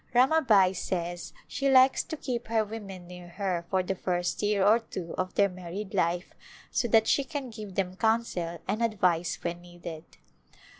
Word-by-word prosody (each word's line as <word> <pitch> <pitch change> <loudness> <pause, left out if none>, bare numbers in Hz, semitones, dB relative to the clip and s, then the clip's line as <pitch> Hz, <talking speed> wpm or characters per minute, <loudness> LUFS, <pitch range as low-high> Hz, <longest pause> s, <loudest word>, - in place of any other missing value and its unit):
Ramabai 245 -9 +5
says 175 -1 -3 0.2
she 275 0 0
likes 260 0 +6
to 315 - -5
keep 245 -4 -4
her 225 -1 +1
women 200 -4 -8
near 180 0 -10
her 175 -2 -3
for 190 -1 +1
the 185 - -1
first 180 -1 -2
year 205 -2 +2
or 215 +3 +6
two 185 -7 -7
of 185 0 -3
their 200 - +5
married 185 +2 -7
life 175 -1 0 0.4
so 240 - +1
that 220 -1 +5
she 280 - +3
can 275 -3 -5
give 210 -3 -8
them 185 -1 -1
counsel 220 -7 0
and 210 +4 -1
advice 180 -7 +1
when 175 0 -3
needed. 175 -2 -9
195 Hz, 170 wpm, -28 LUFS, 175-225 Hz, 0.4 s, likes